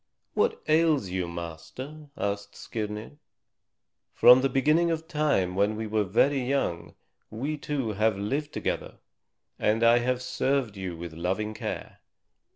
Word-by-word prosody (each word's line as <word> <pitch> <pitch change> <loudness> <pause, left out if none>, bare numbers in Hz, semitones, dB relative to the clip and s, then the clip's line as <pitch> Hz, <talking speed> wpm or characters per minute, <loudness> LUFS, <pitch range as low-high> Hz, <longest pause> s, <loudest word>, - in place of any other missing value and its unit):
"What 450 +1 +1
ails 155 - +3
you, 90 -1 -2
master?" 85 - -8
asked 100 0 -3
Skirnir. 110 +5 -6 1.0
"From 125 +1 +8
the 135 - +2
beginning 150 +6 +3
of 160 -1 -2
time 145 - +1
when 100 +2 +2
we 110 +1 -3
were 110 0 +1
very 130 +8 +2
young 125 -10 -1 0.3
we 135 +8 -3
two 145 -5 -2
have 110 0 +1
lived 140 +9 -2
together, - - -3 0.6
and 110 +2 +2
I 115 +1 +6
have 125 +1 -1
served 130 -3 0
you 95 -3 -5
with 85 -1 -7
loving 95 +6 -2
care. - - -6
115 Hz, 140 wpm, -27 LUFS, 100-145 Hz, 1.0 s, From